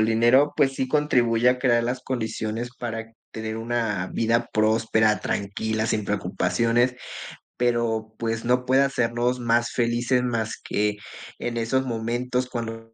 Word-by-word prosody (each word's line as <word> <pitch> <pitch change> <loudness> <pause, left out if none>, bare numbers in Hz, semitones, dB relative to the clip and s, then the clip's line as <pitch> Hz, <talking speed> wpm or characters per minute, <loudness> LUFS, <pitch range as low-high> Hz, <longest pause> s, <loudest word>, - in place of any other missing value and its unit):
el 110 - +3
dinero, 120 +6 +4
pues 135 -2 +3
sí, 130 -1 -2
contribuye 125 -6 +3
a 125 0 +2
crear 120 -3 +3
las 125 +2 -2
condiciones 115 -1 -3
para 115 -1 -5 0.2
tener 110 0 -5
una 115 -5 -1
vida 115 +1 +1
próspera, 110 -1 +2
tranquila, 110 +2 -2
sin 110 -2 0
preocupaciones, 120 +4 +1 0.6
pero, 115 -2 0
pues, 115 0 -2
no 125 +1 +2
puede 130 +2 +4
hacernos 125 -1 0
más 120 0 +2
felices, 120 +1 +1
más 115 -3 -1
que 105 0 0 0.4
en 120 -1 -3
esos 130 +3 0
momentos 120 +2 -2
cuando 115 -2 -6
115 Hz, 140 wpm, -24 LUFS, 110-125 Hz, 0.6 s, dinero